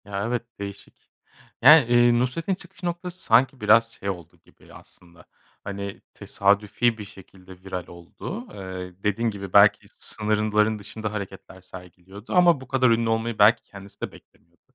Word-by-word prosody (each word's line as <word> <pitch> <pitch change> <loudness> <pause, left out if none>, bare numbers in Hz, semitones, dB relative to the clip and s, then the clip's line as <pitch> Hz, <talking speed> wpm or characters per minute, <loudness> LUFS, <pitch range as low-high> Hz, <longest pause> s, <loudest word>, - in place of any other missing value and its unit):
Ya, 100 0 -4
evet, 120 0 -2 0.2
değişik. 100 0 -10 0.5
Yani, 150 +2 +8
eee, 120 0 +4
Nusret'in 160 +10 -1
çıkış 185 - -16
noktası 175 +1 -5
sanki 125 +3 +3
biraz 115 +2 +4
şey 100 -3 -6
oldu 85 -4 -7
gibi - - -20
aslında, 85 -1 -17 0.4
hani, 100 0 -6
tesadüfi 105 +4 0
bir 105 - -7
şekilde 95 -1 -15
viral 90 -2 -6
oldu. 130 - -9
Eee, 95 -1 -8
dediğin 110 +3 0
gibi, 100 -3 -8
belki 100 0 +5
sınırların 105 0 -1
dışında 110 +1 -6
hareketler 95 -2 -8
sergiliyordu 95 +3 -12
ama 175 -6 +4
bu 130 - -11
kadar 130 -1 +2
ünlü 115 0 +2
olmayı 115 0 -2
belki 105 +3 +5
kendisi 100 0 -14
de - - -4
beklemiyordu. - - -22
105 Hz, 150 wpm, -24 LUFS, 95-120 Hz, 0.5 s, Yani